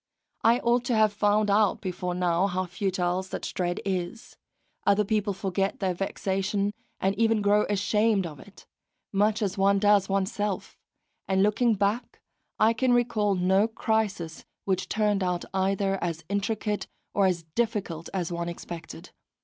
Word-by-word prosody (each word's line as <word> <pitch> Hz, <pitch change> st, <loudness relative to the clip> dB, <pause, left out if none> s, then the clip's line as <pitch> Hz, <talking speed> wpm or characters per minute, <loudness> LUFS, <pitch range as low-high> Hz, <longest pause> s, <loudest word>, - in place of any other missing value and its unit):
I 230 Hz, +2 st, +5 dB
ought 240 Hz, +1 st, +2 dB
to 245 Hz, -, +1 dB
have 215 Hz, -1 st, +4 dB
found 205 Hz, 0 st, +2 dB
out 205 Hz, -1 st, +3 dB
before 180 Hz, -2 st, -3 dB
now 180 Hz, +1 st, +2 dB
how 185 Hz, 0 st, -1 dB
futile 180 Hz, 0 st, -1 dB
such 190 Hz, -, -6 dB
dread 175 Hz, -1 st, -1 dB
is; 190 Hz, +3 st, -4 dB, 0.5 s
other 200 Hz, +1 st, +3 dB
people 210 Hz, 0 st, 0 dB
forget 195 Hz, 0 st, -2 dB
their 190 Hz, -2 st, 0 dB
vexation 195 Hz, +2 st, -1 dB, 0.3 s
and 190 Hz, +1 st, +1 dB
even 225 Hz, -2 st, +3 dB
grow 205 Hz, +1 st, +3 dB
ashamed 210 Hz, 0 st, +2 dB
of 150 Hz, -4 st, -8 dB
it, 205 Hz, -, -15 dB, 0.5 s
much 210 Hz, +2 st, +2 dB
as 195 Hz, 0 st, -2 dB
one 200 Hz, +1 st, +4 dB
does 205 Hz, -1 st, +4 dB
oneself; 195 Hz, +1 st, -1 dB, 0.5 s
and 190 Hz, 0 st, +3 dB
looking 220 Hz, +2 st, +3 dB
back 205 Hz, +5 st, -1 dB, 0.4 s
I 220 Hz, +1 st, +4 dB
can 245 Hz, +2 st, +2 dB
recall 230 Hz, -4 st, +2 dB
no 190 Hz, +3 st, +3 dB
crisis 215 Hz, -7 st, -2 dB, 0.2 s
which 190 Hz, -1 st, -1 dB
turned 210 Hz, -2 st, +1 dB
out 180 Hz, -1 st, -1 dB
either 195 Hz, 0 st, 0 dB
as 165 Hz, -2 st, -3 dB
intricate 210 Hz, +1 st, -1 dB, 0.3 s
or 200 Hz, -1 st, +3 dB
as 175 Hz, -3 st, -1 dB
difficult 195 Hz, -8 st, -2 dB
as 180 Hz, -3 st, -2 dB
one 170 Hz, 0 st, -3 dB
expected. 170 Hz, -1 st, -8 dB
200 Hz, 150 wpm, -27 LUFS, 185-210 Hz, 0.5 s, I